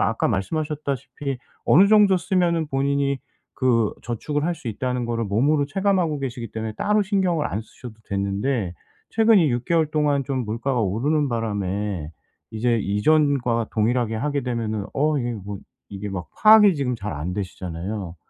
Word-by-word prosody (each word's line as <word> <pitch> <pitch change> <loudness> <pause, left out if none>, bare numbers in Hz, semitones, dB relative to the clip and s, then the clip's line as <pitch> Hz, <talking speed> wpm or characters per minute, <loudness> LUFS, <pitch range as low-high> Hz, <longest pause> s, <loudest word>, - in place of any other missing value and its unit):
아까 115 - +1
말씀하셨다시피 140 +3 -3 0.3
어느 190 +6 +6
정도 205 -3 +6
쓰면은 170 -3 +1
본인이 140 0 0 0.4
그 115 -4 +2
저축을 145 +5 -2
할 175 +1 0
수 125 - -7
있다는 125 +2 -2
거를 115 -1 -1
몸으로 140 +8 +2
체감하고 185 -3 +1
계시기 125 -4 -5
때문에 110 -1 -4
따로 210 - +2
신경을 185 -6 +1
안 105 - -3
쓰셔도 120 +1 -12 0.2
됐는데 100 0 -1 0.4
최근 225 -1 +5
이 160 -5 +3
6 120 0 -1
개월 165 0 +2
동안 145 -3 +1
좀 130 -2 -2
물가가 115 +4 -1
오르는 135 +9 +1
바람에 100 -6 -2 0.4
이제 115 +1 +1
이전과 120 +2 +2
동일하게 115 +1 +1
하게 145 +3 -1
되면은 110 -4 -2
'어 150 +1 +1
이게 120 -1 -2
뭐' 100 -2 -6 0.4
이게 100 +1 -5
막 95 -3 -5
파악이 215 -3 +7
지금 125 -4 -1
잘 105 -4 -5
안 75 +5 -4
되시잖아요. 90 -1 -5
125 Hz, 345 characters per minute, -23 LUFS, 105-150 Hz, 0.4 s, 파악이